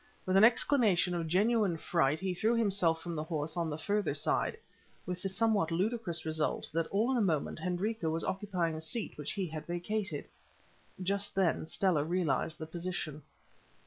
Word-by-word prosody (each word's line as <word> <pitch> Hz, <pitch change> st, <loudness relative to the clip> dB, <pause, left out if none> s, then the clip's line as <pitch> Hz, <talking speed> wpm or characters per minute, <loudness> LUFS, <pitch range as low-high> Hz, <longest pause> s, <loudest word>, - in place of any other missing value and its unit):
With 185 Hz, -, +1 dB
an 195 Hz, -, +7 dB
exclamation 220 Hz, -7 st, +4 dB
of 170 Hz, -2 st, -2 dB
genuine 200 Hz, +1 st, +2 dB
fright 155 Hz, -2 st, +1 dB
he 190 Hz, -1 st, -1 dB
threw 220 Hz, +6 st, +1 dB
himself 190 Hz, -7 st, +2 dB
from 170 Hz, -, -4 dB
the 155 Hz, -, -2 dB
horse 155 Hz, -1 st, -3 dB
on 170 Hz, -2 st, -1 dB
the 150 Hz, -, -3 dB
further 205 Hz, +5 st, 0 dB
side, -, -, 0 dB, 0.5 s
with 180 Hz, 0 st, -4 dB
the 195 Hz, -, -2 dB
somewhat 205 Hz, -3 st, +2 dB
ludicrous 185 Hz, 0 st, +1 dB
result 155 Hz, -1 st, -1 dB
that 165 Hz, 0 st, 0 dB
all 220 Hz, +6 st, +1 dB
in 260 Hz, -, +2 dB
a -, -, +2 dB
moment 165 Hz, -8 st, 0 dB
Hendrika 185 Hz, 0 st, -1 dB
was 165 Hz, +1 st, -1 dB
occupying 185 Hz, -4 st, -1 dB
the 155 Hz, -, -5 dB
seat 210 Hz, +8 st, 0 dB
which 150 Hz, -1 st, -4 dB
he 195 Hz, -2 st, -2 dB
had 155 Hz, -2 st, -7 dB
vacated. 190 Hz, +4 st, -3 dB, 0.8 s
Just 200 Hz, +2 st, -1 dB
then 180 Hz, -4 st, +1 dB
Stella 175 Hz, -4 st, +2 dB
realized 165 Hz, -1 st, 0 dB
the 160 Hz, -, -6 dB
position. 165 Hz, -2 st, -4 dB
180 Hz, 175 wpm, -32 LUFS, 160-205 Hz, 0.8 s, an